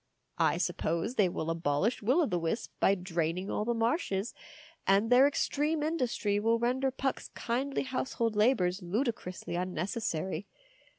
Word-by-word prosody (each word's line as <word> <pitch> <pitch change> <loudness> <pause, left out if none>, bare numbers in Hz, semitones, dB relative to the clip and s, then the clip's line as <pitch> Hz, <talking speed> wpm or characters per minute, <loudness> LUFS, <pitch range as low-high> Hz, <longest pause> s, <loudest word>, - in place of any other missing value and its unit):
I - - +3
suppose 170 +8 -1
they 205 -7 +3
will 165 -1 -2
abolish 165 - 0
Will 255 +11 +3
o' - - +3
the 180 -10 -1
Wisp 170 +7 -2
by 195 - +4
draining 180 0 -2
all 210 - -1
the 235 0 0
marshes, 230 - 0 0.5
and 200 +4 +3
their 255 +3 +7
extreme 295 +2 0
industry 245 -10 0
will 225 +2 +2
render 255 +3 +1
Puck's 265 +1 -2
kindly 260 +4 -1
household 255 -4 -2
labours 210 -4 +2
ludicrously 185 -2 -3
un 180 +1 -2
necessary. 185 -1 -2
215 Hz, 150 wpm, -31 LUFS, 180-255 Hz, 0.5 s, their